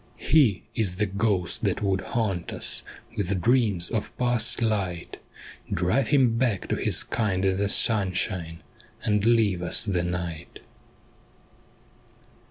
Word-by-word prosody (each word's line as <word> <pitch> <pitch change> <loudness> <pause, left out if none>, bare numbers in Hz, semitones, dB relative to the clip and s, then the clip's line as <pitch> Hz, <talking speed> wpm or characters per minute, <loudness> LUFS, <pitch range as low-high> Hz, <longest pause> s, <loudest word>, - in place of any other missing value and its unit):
' - - -32 0.2
He 125 - +4
is 100 -6 -1
the 105 +3 0
ghost 100 -3 -1
that - - -1
would 95 -1 +1
haunt 100 -8 -2
us - - -1 0.3
With 100 -3 -1
dreams 110 -6 +2
of 110 -3 -3
past 120 -2 +1
light; 100 -7 -2 0.5
Drive 90 +10 +1
him 125 -6 +3
back 120 -7 0
to - - +1
his - - +2
kind 100 -4 -1
in 95 -1 +1
the 100 0 0
sunshine, 95 -6 0 0.4
And 105 -1 +1
leave 110 -6 +3
us 90 - +1
the 95 -4 0
night.' 85 -1 -5
100 Hz, 135 wpm, -25 LUFS, 90-115 Hz, 0.5 s, He